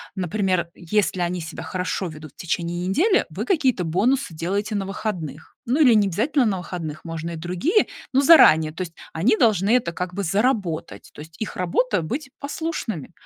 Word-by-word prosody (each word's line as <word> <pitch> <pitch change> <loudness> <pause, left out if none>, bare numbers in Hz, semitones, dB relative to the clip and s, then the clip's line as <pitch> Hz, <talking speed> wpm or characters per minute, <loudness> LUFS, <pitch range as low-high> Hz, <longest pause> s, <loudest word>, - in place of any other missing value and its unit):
Например, 185 -2 0
если 185 +1 0
они 175 +1 -1
себя 165 0 -7
хорошо 185 +1 -3
ведут 155 -2 -10
в - - -60
течение 175 +1 -2
недели, 375 - +3
вы - - -5
какие-то 265 - +1
бонусы 210 +6 +1
делаете 200 +7 -2
на 200 -1 -1
выходных. 175 -7 -5
Ну, 255 +6 +1
или 250 -5 +7
не 210 -2 +4
обязательно 245 - +1
на 205 -4 0
выходных, 170 -3 -6
можно 165 0 -5
и - - -5
другие, 180 - +1 0.3
но 270 - +4
заранее. 160 - +7
То 165 - -6
есть 170 -2 -5 0.2
они 220 +8 +2
должны 205 -5 +3
это 170 -8 -3
как 180 +1 -4
бы 200 +2 -3
заработать, 195 -3 -1
то - - -14
есть 160 +1 -13
их 220 - -4
работа 185 +3 0
быть 265 - -5
послушными. 280 - -4
185 Hz, 180 wpm, -23 LUFS, 170-235 Hz, 0.3 s, или